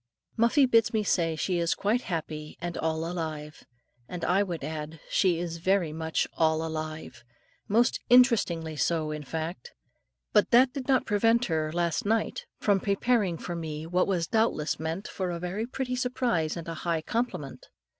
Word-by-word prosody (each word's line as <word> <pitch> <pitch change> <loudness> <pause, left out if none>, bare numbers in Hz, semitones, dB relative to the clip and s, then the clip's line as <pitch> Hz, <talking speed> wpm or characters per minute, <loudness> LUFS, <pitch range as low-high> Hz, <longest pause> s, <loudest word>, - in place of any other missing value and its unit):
Muffie 235 +5 +4
bids 230 -3 +3
me 215 -1 +1
say 165 -5 +1
she 175 +2 -1
is 170 -1 +1
quite 215 +5 +1
happy 155 -5 -5
and 175 0 -4
all 160 0 -1
alive. 155 -3 -5 0.4
And 175 -2 -4
I 190 +3 +3
would 175 -7 -3
add, 155 +1 -5
she 180 -3 +3
is 170 -1 -4
very 180 -2 +1
much 160 0 -1
all 160 0 +2
alive, 155 -5 -6 0.4
most 235 +4 +3
interestingly 205 -11 +4
so, 155 0 0
in 150 0 -4
fact. 160 +1 -5 0.6
But - - +4
that 250 +2 +5
did 275 -3 -5
not 265 -2 +3
prevent 225 +3 +3
her, 155 -4 -1
last 170 -1 0
night, 220 +1 -1
from 200 -2 +2
preparing 200 -2 +1
for 175 - -5
me, 160 -2 -5
what 180 +2 +1
was 180 -4 0
doubtless 220 -7 0
meant 165 +5 -3
for 185 -2 -3
a 170 - -3
very 185 +6 -3
pretty 255 0 -3
surprise 245 -11 0
and 170 - -7
a 165 - -3
high 165 -2 -1
compliment. 150 - -3
170 Hz, 170 wpm, -28 LUFS, 160-215 Hz, 0.6 s, that